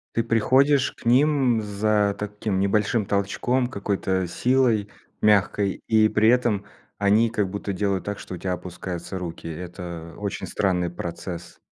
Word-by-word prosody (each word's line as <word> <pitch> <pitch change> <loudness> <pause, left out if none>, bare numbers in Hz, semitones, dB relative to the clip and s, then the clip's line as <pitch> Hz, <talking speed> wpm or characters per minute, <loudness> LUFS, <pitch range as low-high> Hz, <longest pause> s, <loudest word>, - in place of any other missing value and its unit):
Ты 115 - +3
приходишь 130 +5 +3
к - - -19
ним 130 -2 +4
за 105 0 +1
таким 105 -1 -2
небольшим 105 +2 +1
толчком, 120 +6 0
какой-то 95 -5 -1
силой, 120 +1 +2 0.3
мягкой, 100 -1 +2
и 110 -1 +5
при 110 +1 +3
этом 120 -5 +2 0.3
они 105 +3 +3
как 105 -4 0
будто 100 0 -4
делают 95 0 -1
так, 100 0 -4
что 95 - -7
у - - -7
тя 90 +1 -2
опускаются 90 +1 -6
руки. 85 -2 -6
Это 85 0 -7
очень 100 -2 -4
странный 90 -3 0
процесс. 85 0 -7
100 Hz, 145 wpm, -24 LUFS, 95-115 Hz, 0.3 s, и